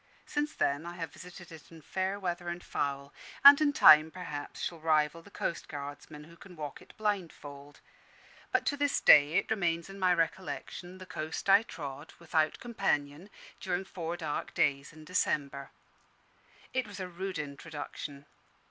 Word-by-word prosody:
Since 295 +1 -2
then 145 +4 0
I 175 - -7
have 165 -3 -6
visited 180 -1 -11
it 160 0 -13
in 165 -2 -13
fair 190 +4 -2
weather 175 -2 -3
and 175 0 -5
foul; 140 0 -3 0.3
and 280 +1 +11
in 295 -1 +4
time, 155 - +8
perhaps, 155 -5 -7
shall 170 - -4
rival 155 0 +1
the 185 - -16
coastguardsmen, 150 -4 -6
who 165 +1 -15
can 180 +1 -14
walk 150 -3 -7
it - - -17
blindfold. 160 -9 -4 0.7
But - - +1
to 285 - 0
this 285 0 +1
day 150 +1 +7
it - - +1
remains 175 -4 0
in 195 - -10
my 185 -1 +3
recollection 175 +1 -3
the 185 - -10
coast 160 -2 -5
I 200 +2 +8
trod, 150 -6 -8
without 160 -2 0
companion, 185 -7 -2 0.3
during 185 0 -2
four 175 -2 -5
dark 155 -4 -4
days 140 -1 +1
in 155 -1 -14
December. 140 -5 -1 1.0
It 260 -3 0
was 205 -1 -9
a 185 - -4
rude 185 +1 -5
introduction. 145 -1 -7
165 Hz, 160 wpm, -31 LUFS, 150-185 Hz, 1.0 s, and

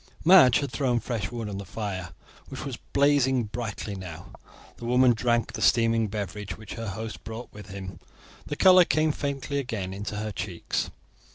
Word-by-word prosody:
Madge 155 -8 +7
had 140 -3 -3
thrown 125 -3 +1
fresh 110 -5 -3
wood 115 -3 -4
on 100 -1 -5
the - - -5
fire, 95 -4 -5 0.4
which - - -7
was - - -4
blazing 140 -3 +2
brightly 110 -1 -5
now. 85 -4 -8 0.5
The 120 - -8
woman 125 +1 +5
drank 120 0 0
the - - -5
steaming 115 -1 +3
beverage 105 -1 -5
which 110 -1 -9
her 115 -1 -5
host 110 +3 -6
brought 115 +2 -8
with 105 0 -10
him. 95 -2 -8 0.5
The 145 - -3
colour 185 +2 +7
came 155 -2 +2
faintly 140 0 -3
again 110 -8 -4
into 105 +2 -5
her 105 +1 -3
cheeks. 90 -2 -3
115 Hz, 175 wpm, -27 LUFS, 100-130 Hz, 0.5 s, Madge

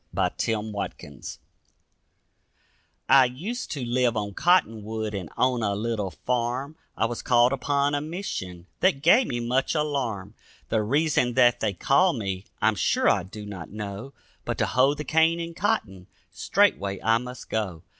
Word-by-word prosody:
A - - +2 0.2
MORMON 105 - -5
SONG - - -7 1.7
I 130 - +7
used 185 - -5
to 135 -5 -4
live 120 -1 +1
on 100 -1 -3
Cottonwood 110 - +1
and 95 -5 -5
owned 125 -2 +2
a 100 -1 0
little 105 -2 -2
farm, 125 +7 -2 0.2
I - - +2
was 120 0 -3
called 120 +1 +4
upon 140 +2 0
a 145 - 0
mission 145 - -5
that 150 -7 +2
gave 235 +10 +5
me 120 - -2
much 125 +5 0
alarm; 125 -10 -2 0.4
The 110 - +1
reason 130 0 +1
that 120 -2 +5
they 105 -3 0
called 150 - +2
me, 95 -3 -4 0.2
I'm 110 0 +4
sure 90 - +1
I 100 - +4
do 105 +4 -9
not 95 -5 -8
know. 105 +5 -7 0.3
But - - -3
to - - +1
hoe 135 +3 +3
the 150 - -5
cane 160 +2 +3
and 170 0 -5
cotton, 105 - -1 0.2
straightway 100 0 +1
I 115 +1 +3
must 125 +1 -9
go. 95 -7 -2
120 Hz, 160 wpm, -25 LUFS, 105-140 Hz, 1.7 s, I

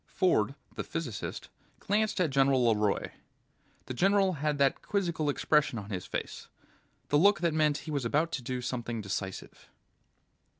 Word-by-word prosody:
Ford, 140 - +1 0.2
the - - -4
physicist, 145 -11 -5 0.3
glanced 210 0 0
at 170 -6 +2
General 135 -2 +3
LeRoy. 105 -3 +1 0.7
The - - -5
general 195 +6 +3
had 150 -1 -1
that 140 -1 +2
quizzical 170 -7 -1
expression 145 -2 +2
on 105 0 -7
his 90 -2 -4
face, - - -5 0.6
the 145 - +4
look 200 -1 +5
that 170 -2 +1
meant 150 -2 +2
he 155 - -5
was 140 -3 -1
about 150 +8 +1
to 135 - -3
do 125 +1 -4
something 120 -2 -3
decisive. 95 -1 -6
145 Hz, 155 wpm, -30 LUFS, 120-165 Hz, 0.7 s, look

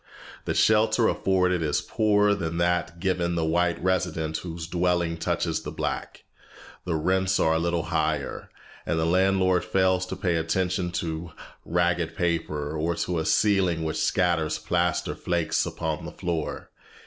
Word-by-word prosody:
The - - -1
shelter 110 +1 +4
afforded 90 -2 +1
is 75 -3 +1
poorer 105 -1 +2
than 85 -4 -3
that 85 0 0
given 85 -2 0
the 85 -1 0
white 85 +2 +1
resident 85 -4 0
whose 85 -1 -6
dwelling 85 -1 0
touches 80 - -1
the - - -6
black, - - -4 0.6
the 85 -3 -1
rents 95 +4 +1
are 80 - +3
a 80 - +1
little 85 0 0
higher, 80 -3 -2 0.3
and 85 - -1
the 80 - +1
landlord 95 +1 +3
fails 95 -1 +1
to 95 - -4
pay 90 -2 0
attention 90 +2 0
to 85 -1 -4 0.3
ragged 85 -1 0
paper, 80 -3 -1
or 80 +2 -1
to 90 0 -1
a 80 - -2
ceiling 95 -6 +2
which 80 -1 -2
scatters 85 -4 +1
plaster 85 +2 0
flakes 85 -2 0
upon - - -3
the - - -6
floor. 85 -3 -4
85 Hz, 150 wpm, -26 LUFS, 80-95 Hz, 0.6 s, shelter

